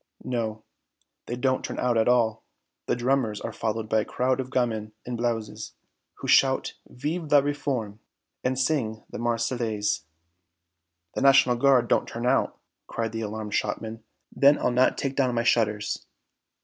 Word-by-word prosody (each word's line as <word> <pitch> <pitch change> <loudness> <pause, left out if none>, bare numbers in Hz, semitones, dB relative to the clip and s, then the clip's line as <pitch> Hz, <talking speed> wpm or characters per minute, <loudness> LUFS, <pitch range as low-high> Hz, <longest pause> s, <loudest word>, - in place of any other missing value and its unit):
"No. 110 -3 -3 0.6
They 120 - -3
don't 130 +1 0
turn - - -5
out 125 -1 +1
at 110 -1 +3
all. 115 -3 +2 0.4
The - - +2
drummers 120 -3 0
are - - -5
followed 110 0 -2
by 110 0 +2
a - - +1
crowd 130 +4 0
of 130 -1 -3
gamins 110 -5 -1
in 125 - -4
blouses, 115 -3 -3 0.4
who - - -7
shout - - +4
Vive 150 +5 -4
la 145 -1 +7
Réforme 130 -7 -2 0.4
and 130 0 0
sing 125 -6 0
the - - -6
Marseillaise." 115 -5 -1 1.1
"The - - -3
National 135 -2 +6
Guard 125 -1 +4
don't - - +2
turn 115 +1 -5
out!" 130 +2 +2 0.3
cried 115 -1 -3
the 115 0 -4
alarmed 110 -1 -5
shopman; 110 +1 -2 0.3
"then 140 +1 +6
I'll - - +1
not 125 +1 +3
take 135 -1 -2
down 130 -3 +1
my 115 - +1
shutters!" 105 -3 +1
120 Hz, 160 wpm, -26 LUFS, 110-130 Hz, 1.1 s, la